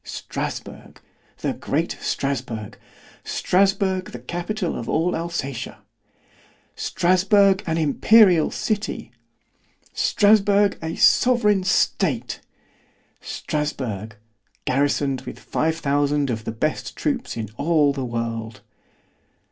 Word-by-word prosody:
—Strasburg!——the - - -7
great - - -1
Strasburg!——Strasburg, 185 - -2
the - - -8
capital 175 - -3
of 115 - -5
all 170 +3 +1
Alsatia! 160 -7 -4 0.9
Strasburg, 190 +2 +3
an 165 0 0
imperial 175 +3 +5
city! 215 -1 -3 0.8
Strasburg, 205 -1 +3
a 160 0 -4
sovereign 210 -6 +4
state! 155 - 0 0.8
Strasburg, 115 -9 -4 0.5
garrisoned 140 0 +1
with - - -8
five 160 +1 -1
thousand 145 -2 +1
of 110 -1 -4
the - - -2
best 155 +8 -2
troops 265 - -2
in 110 -3 -4
all 150 -2 +3
the 135 -2 -4
world! 115 -3 -4
160 Hz, 90 wpm, -23 LUFS, 130-190 Hz, 0.9 s, imperial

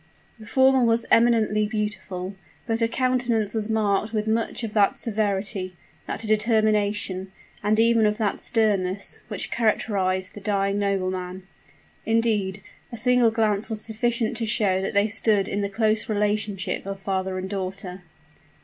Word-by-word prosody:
The 215 - -12
former 265 +2 +4
was 230 0 +2
eminently 220 -3 +3
beautiful; 210 -3 -4 0.3
but 225 -1 -1
her 230 - +2
countenance 240 -3 0
was 220 -1 -2
marked 215 0 0
with 215 0 -1
much 225 +2 -1
of 220 -2 -4
that 205 -2 +3
severity 200 -4 -1 0.3
that - - -4
determination 210 -3 +1 0.3
and 210 +2 +1
even 230 -1 +4
of 210 0 0
that 210 -3 -1
sternness, 200 -4 +1
which 210 -4 -5
characterized 195 -4 0
the 205 - -10
dying 200 -1 0
nobleman. 185 -2 -2 0.6
Indeed, 215 -4 0 0.3
a 235 - -6
single 250 0 +4
glance 220 -1 0
was 220 -1 -2
sufficient 230 +1 -1
to 225 -1 -2
show 195 -3 +1
that 195 - -3
they 200 +1 +4
stood 210 -2 +2
in 205 - -2
the 200 - -1
close 215 +1 0
relationship 205 -2 -1
of 195 0 -5
father 190 -1 -2
and 185 0 -4
daughter. 190 -1 -5
210 Hz, 150 wpm, -24 LUFS, 195-225 Hz, 0.6 s, former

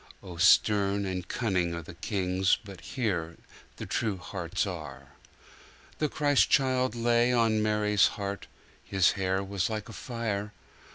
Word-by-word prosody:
(O 90 -3 -9
stern 100 +2 +4
and 90 -1 -4
cunning 90 -8 -1
are 85 - -6
the 80 - -10
kings, 95 0 0
But 100 -3 -10
here 90 -10 -3 0.4
the - - -7
true 105 -5 -1
hearts 90 -2 -3
are.)3. 70 -7 -12
The 150 - +1
Christ 145 -1 +2
child 130 -3 +2
lay 120 +1 +2
on 115 -3 +2
Mary's 105 -1 +3
heart, 100 -1 -5 0.4
His 95 -3 +3
hair 95 -1 -1
was 95 -1 -2
like 110 -1 -4
a - - -9
fire. 105 -4 -4
100 Hz, 145 wpm, -28 LUFS, 90-115 Hz, 0.4 s, stern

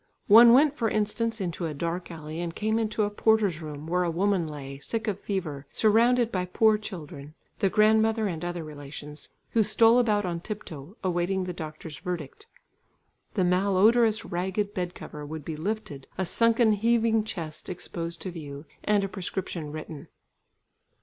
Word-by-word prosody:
One 230 +3 +9
went 290 +3 +5
for 230 -6 0
instance 220 +2 -1
into 175 -2 -3
a 155 - -5
dark 170 +4 -3
alley 155 -1 -7
and 170 -1 -4
came 220 +1 0
into 215 -1 0
a 205 - -1
porter's 205 -6 +2
room, 150 -1 -7
where 180 +2 0
a 175 - +1
woman 185 0 +1
lay, 140 -2 -7
sick 225 +10 -4
of 200 -2 -1
fever, 155 -10 -4
surrounded 235 +2 +3
by 180 -1 -1
poor 215 +4 +3
children, 155 -7 -8 0.2
the 195 - +3
grandmother 220 +2 +3
and 175 -4 -3
other 175 -1 -3
relations, 150 0 -9 0.2
who 230 - +3
stole 225 +3 +5
about 210 -4 +2
on 170 -2 -2
tip 210 +4 -6
toe, 155 +6 -10
awaiting 185 +1 0
the 180 -1 -4
doctor's 155 -2 -8
verdict. 180 - -6 0.9
The 190 - +2
malodorous 210 +5 +3
ragged 190 +4 -2
bed 180 -1 -3
cover 150 0 -8
would 150 0 -7
be 160 - -4
lifted, 160 -5 -4
a 190 - 0
sunken 230 +3 +3
heaving 225 +1 +2
chest 165 -7 -6
exposed 170 -1 -6
to 185 - -4
view, 145 -3 -8 0.2
and 210 -1 +2
a - - 0
prescription 185 -5 -5
written. 155 -1 -8
185 Hz, 170 wpm, -27 LUFS, 160-215 Hz, 0.9 s, One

